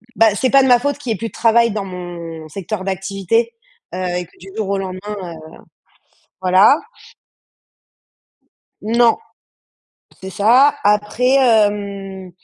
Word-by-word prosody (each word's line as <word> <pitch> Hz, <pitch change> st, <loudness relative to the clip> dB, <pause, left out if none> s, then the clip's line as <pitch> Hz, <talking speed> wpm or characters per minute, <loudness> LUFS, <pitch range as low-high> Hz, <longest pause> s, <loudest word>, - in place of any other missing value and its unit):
bah, 220 Hz, -2 st, +4 dB
c'est 255 Hz, +5 st, 0 dB
pas 275 Hz, -, +6 dB
de -, -, +2 dB
ma 245 Hz, -1 st, +6 dB
faute 285 Hz, +3 st, -2 dB
qu'il 255 Hz, -5 st, -4 dB
y -, -, +2 dB
ait -, -, -8 dB
plus 230 Hz, +2 st, -5 dB
de -, -, -27 dB
travail 235 Hz, 0 st, +3 dB
dans 205 Hz, -1 st, -4 dB
mon 170 Hz, -3 st, -8 dB
secteur 195 Hz, +3 st, -5 dB
d'activité, 195 Hz, +4 st, -1 dB, 0.4 s
heu, -, -, -4 dB, 0.2 s
et 180 Hz, -, -4 dB
que 175 Hz, -, -26 dB
du 185 Hz, -, -13 dB
jour 215 Hz, -3 st, -3 dB
au 200 Hz, -, 0 dB
lendemain, 185 Hz, -1 st, -5 dB
heu 190 Hz, -5 st, -6 dB, 1.1 s
voilà. 185 Hz, +8 st, +5 dB, 2.1 s
Non. 230 Hz, +2 st, +3 dB, 1.0 s
C'est 190 Hz, -, -7 dB
ça. 240 Hz, +8 st, +4 dB
Après, 210 Hz, +4 st, +1 dB
hem, 200 Hz, -6 st, 0 dB
205 Hz, 145 wpm, -18 LUFS, 190-230 Hz, 2.1 s, pas